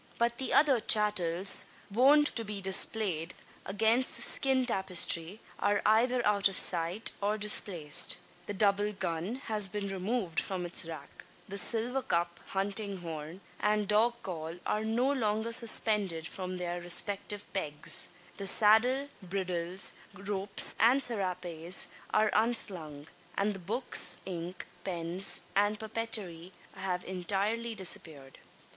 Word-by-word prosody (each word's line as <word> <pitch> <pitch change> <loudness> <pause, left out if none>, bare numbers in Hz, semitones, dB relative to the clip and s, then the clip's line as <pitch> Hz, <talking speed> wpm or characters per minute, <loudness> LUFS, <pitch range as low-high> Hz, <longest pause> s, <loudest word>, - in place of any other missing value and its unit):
But 235 0 -1
the 265 - -3
other 280 -4 +4
"chattels" 200 -4 +3 0.2
wont 280 +7 +4
to 230 - +3
be 210 -1 -6
displayed 190 -3 -1 0.3
against 220 +6 +1
the - - 0
skin 265 -1 +2
tapestry 190 -2 +2 0.2
are 205 0 +1
either 240 +3 +2
out 200 -1 +3
of 195 - -2
sight, 175 +4 +2
or 205 +2 -1
displaced. 175 -6 +2 0.3
The 205 - -5
double 205 +1 +1
gun 180 +3 -4
has 210 -3 +2
been 200 +1 -5
removed 195 -2 -2
from 185 -2 -4
its 175 -1 +3
rack; 160 -1 -11 0.2
the 200 0 -1
silver 235 +6 +1
cup, 170 -5 -2
hunting 200 0 -2
horn, 165 +2 -8 0.2
and 210 -1 0
dog 220 +3 +2
call, 165 -3 -6
are 215 - -1
no 235 +5 0
longer 220 -3 -2
suspended 210 -7 +2
from 185 +1 -6
their 175 0 -4
respective 200 +4 0
pegs; 150 -6 +1 0.3
the 200 - -2
saddle, 235 +7 +4
bridles, 180 -1 -2 0.2
ropes, 200 0 +2
and 260 +4 +4
serapes 180 -5 0 0.2
are 215 0 +2
unslung; 180 -10 -2 0.3
and 205 +1 0
the 195 - -8
books, 190 -2 +1
ink, 180 -1 -6 0.2
pens, 175 +1 +2
and 205 +1 +1
papeterie 215 -6 -3 0.2
have 180 -2 -4
entirely 205 +5 -3
disappeared. 155 -8 -3
200 Hz, 130 wpm, -30 LUFS, 180-220 Hz, 0.3 s, other